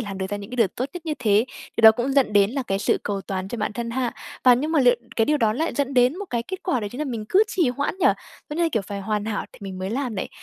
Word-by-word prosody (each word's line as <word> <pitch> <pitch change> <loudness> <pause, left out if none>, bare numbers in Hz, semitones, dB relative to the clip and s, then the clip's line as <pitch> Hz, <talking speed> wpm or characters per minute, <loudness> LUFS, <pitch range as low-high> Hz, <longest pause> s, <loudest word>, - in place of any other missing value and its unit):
làm 195 -1 -6
được 190 - -2
ra 205 - -1
những 200 +2 -9
cái 250 - -6
điều 230 -4 +4
tốt 255 - -1
nhất 345 -2 -8
như 305 - -1
thế, 215 -1 +3 0.3
điều 230 - -1
đó 220 0 +10
cũng 245 +4 -2
dẫn 270 -6 +3
đến 200 0 +4
là 270 +1 -2
cái 195 -4 -2
sự - - +1
cầu 200 -1 -2
toàn 190 -1 -4
cho 240 - -5
bản 210 - -1
thân 235 0 -4
ha? 250 -1 -1 0.3
Và 250 -1 +8
nhưng 300 +6 -1
mà 305 - +4
liệu 245 -1 +6 0.2
cái 225 - +4
điều 300 +3 +2
đó 220 -5 +2
lại 320 +8 -2
dẫn 275 -1 -1
đến 250 +8 +3
một 405 - -4
cái 235 -1 -1
kết 375 +9 -7
quả, 265 -11 0
đó 205 - -3
chính 250 - -8
là 305 - -1
mình 230 -6 -4
cứ 400 +3 +5
trì 340 -8 +1
hoãn 280 +7 -1
nhỉ? - - +3 0.4
Nó 300 - -4
như 345 - +1
là, 335 - +3
kiểu, 220 -4 +1
phải 200 +1 -6
hoàn 210 +1 -2
hảo 215 -2 -2
thì - - -15
mình 190 -1 -6
mới 190 +2 -3
làm 250 -2 -2
này. - - -3
240 Hz, 335 wpm, -23 LUFS, 205-275 Hz, 0.4 s, đó